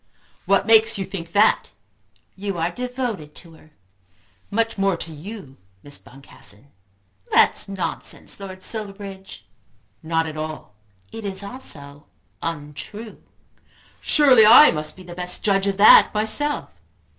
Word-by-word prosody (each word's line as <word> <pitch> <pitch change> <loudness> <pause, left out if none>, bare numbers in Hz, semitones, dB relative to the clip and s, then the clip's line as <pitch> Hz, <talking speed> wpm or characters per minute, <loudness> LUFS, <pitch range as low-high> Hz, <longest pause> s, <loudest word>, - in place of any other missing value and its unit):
"What 195 -1 +3
makes 225 0 +4
you 195 - -3
think 170 -4 -8
that?" 210 +2 +2 0.6
"You 195 -1 -5
are 165 +1 -1
devoted 245 - -5
to 165 -2 -11
her." 155 -1 -19 0.8
"Much 225 +2 -1
more 195 -2 0
to 165 -1 -6
you, 165 -3 -10 0.3
Miss 145 0 -3
Boncassen." 130 -2 -10 0.6
"That - - +5
is - - 0
nonsense, 195 +1 -3
Lord 190 -1 -9
Silverbridge." 195 - -4 0.6
"Not 165 0 -1
at 155 -1 -7
all." 155 -7 -7 0.4
"It 225 - -8
is 195 -1 -2
also 145 - -8 0.3
untrue." 165 +8 -7 0.8
"Surely 270 -7 +5
I 235 +8 +9
must 155 -1 -4
be 185 - -13
the 175 -1 -10
best 180 0 -6
judge 195 -1 +1
of 195 -1 -1
that 205 - +8
myself." 220 +8 0
195 Hz, 135 wpm, -22 LUFS, 160-215 Hz, 0.8 s, I